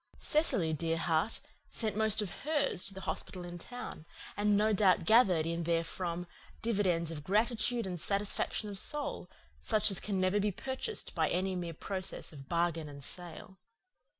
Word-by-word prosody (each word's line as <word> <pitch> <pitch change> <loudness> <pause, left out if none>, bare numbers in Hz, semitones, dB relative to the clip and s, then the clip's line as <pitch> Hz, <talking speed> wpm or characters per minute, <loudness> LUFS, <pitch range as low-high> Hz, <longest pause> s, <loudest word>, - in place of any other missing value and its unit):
Cecily, 200 - +2
dear 165 +1 0
heart, 165 +5 +1 0.3
sent 220 -3 -2
most 220 0 +3
of 190 - -5
hers 290 - +3
to 195 - +3
the 190 - -7
hospital 180 -1 -3
in 175 0 -7
town, 245 -8 -7 0.3
and 205 0 +3
no 215 +1 +3
doubt 190 -4 +4
gathered 195 -8 +5
in 170 +1 -2
therefrom 170 +1 -1 0.4
dividends 185 -7 +1
of 150 -3 -6
gratitude 230 +4 +1
and 180 -2 -4
satisfaction 200 +3 0
of 200 -2 -4
soul, 295 +5 -3 0.3
such 215 -1 +2
as 195 - 0
can 200 -2 -2
never 185 +2 +2
be 205 +1 +1
purchased 265 - -3
by - - +1
any 185 +1 0
mere 170 -2 -4
process 190 -1 -4
of 135 -2 -11
bargain 170 -2 0
and 140 -1 -10
sale. 180 +3 -8
190 Hz, 165 wpm, -32 LUFS, 170-215 Hz, 0.4 s, gathered